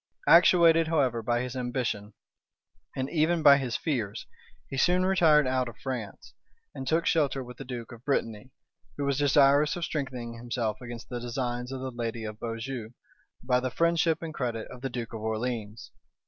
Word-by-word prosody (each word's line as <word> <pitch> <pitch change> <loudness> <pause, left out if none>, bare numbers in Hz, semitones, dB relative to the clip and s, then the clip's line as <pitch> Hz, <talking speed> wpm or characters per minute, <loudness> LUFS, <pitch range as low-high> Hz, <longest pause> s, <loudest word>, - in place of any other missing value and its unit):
Actuated, 170 -1 +6
however, 135 -8 +1
by 120 +1 0
his 125 0 -5
ambition, 120 -5 -3 0.8
and 130 0 -2
even 165 0 +1
by 140 -2 +8
his 130 -4 -2
fears, 115 -8 -3 0.4
he 135 - -6
soon 180 +7 +3
retired 160 -6 +4
out 130 -1 0
of 115 - -13
France, 125 -7 -6 0.4
and 135 0 -7
took 165 +3 +1
shelter 140 -4 +1
with 125 -1 -11
the 135 - -7
duke 125 -3 -7
of 120 -1 -12
Brittany, 115 -5 -2 0.5
who 145 - -2
was 140 0 0
desirous 145 +1 +4
of 175 -2 -2
strengthening 130 -6 -4
himself 115 -2 -3
against 120 -1 -8
the 125 - -4
designs 120 +1 -3
of 130 -1 -5
the 130 0 -4
lady 115 -1 -4
of 105 0 -6
Beaujeu 115 0 -5 0.5
by 125 0 +2
the 130 0 -2
friendship 170 +3 +1
and 160 -1 -5
credit 120 -6 -3
of 125 - -10
the 135 - -3
duke 120 -2 -5
of 110 - -6
Orleans. 110 -1 -4
125 Hz, 175 wpm, -28 LUFS, 115-145 Hz, 0.8 s, by